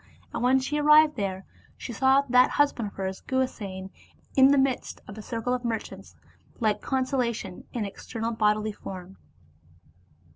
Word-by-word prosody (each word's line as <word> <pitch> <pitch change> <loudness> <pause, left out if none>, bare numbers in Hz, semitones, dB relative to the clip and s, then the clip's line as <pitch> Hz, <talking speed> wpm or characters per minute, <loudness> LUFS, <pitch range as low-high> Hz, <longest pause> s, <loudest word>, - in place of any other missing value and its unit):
And - - -3
when 255 +2 +4
she 280 +3 -1
arrived 300 +1 +6
there, 195 -3 -3 0.3
she 240 - -7
saw 265 +3 +4
that 250 0 +5
husband 280 -6 +1
of 200 - -11
hers, 190 -1 -4
Guhasena, 200 -8 -3 0.4
in 265 0 +7
the 280 +1 +4
midst 265 -2 0
of 205 - -9
a 215 - -8
circle 230 +2 -3
of 250 0 -2
merchants, 230 -2 -5 0.4
like 215 -3 +1
consolation 250 -7 -2
in 230 -4 -2
external 225 +3 -5
bodily 215 -1 +1
form. 190 -2 -9
235 Hz, 150 wpm, -26 LUFS, 205-265 Hz, 0.4 s, in